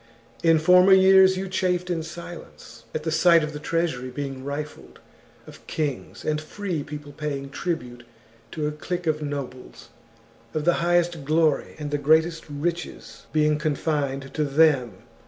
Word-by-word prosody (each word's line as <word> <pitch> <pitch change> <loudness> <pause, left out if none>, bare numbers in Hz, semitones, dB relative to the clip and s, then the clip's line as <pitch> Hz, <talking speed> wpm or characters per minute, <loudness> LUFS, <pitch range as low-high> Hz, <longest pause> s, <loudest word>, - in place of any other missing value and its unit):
In 165 -1 +5
former 180 +4 +6
years 190 0 +6
you 190 +1 -3
chafed 180 -1 -1
in 165 -2 -1
silence 165 -7 -10
at 155 - -4
the 160 - -2
sight 165 0 +5
of 150 0 -4
the 150 - -6
treasury 155 -6 -2
being 135 0 -5
rifled, 145 +2 -7 0.5
of - - -15
kings 150 -4 -4
and 155 0 0
free 175 0 -4
people 145 0 -8
paying 140 -2 -5
tribute 125 -8 -4 0.5
to 155 - -2
a - - -1
clique 175 +4 -5
of 155 -1 0
nobles, 140 -3 -7 0.7
of 155 -1 -1
the 175 - +5
highest 175 -2 +1
glory 155 +1 +1
and 150 -1 -5
the 145 - 0
greatest 160 +3 +2
riches 165 +4 -5
being 150 -1 +2
confined 145 -3 -2
to 155 - 0
them. 140 -4 +2
155 Hz, 155 wpm, -24 LUFS, 145-170 Hz, 0.7 s, former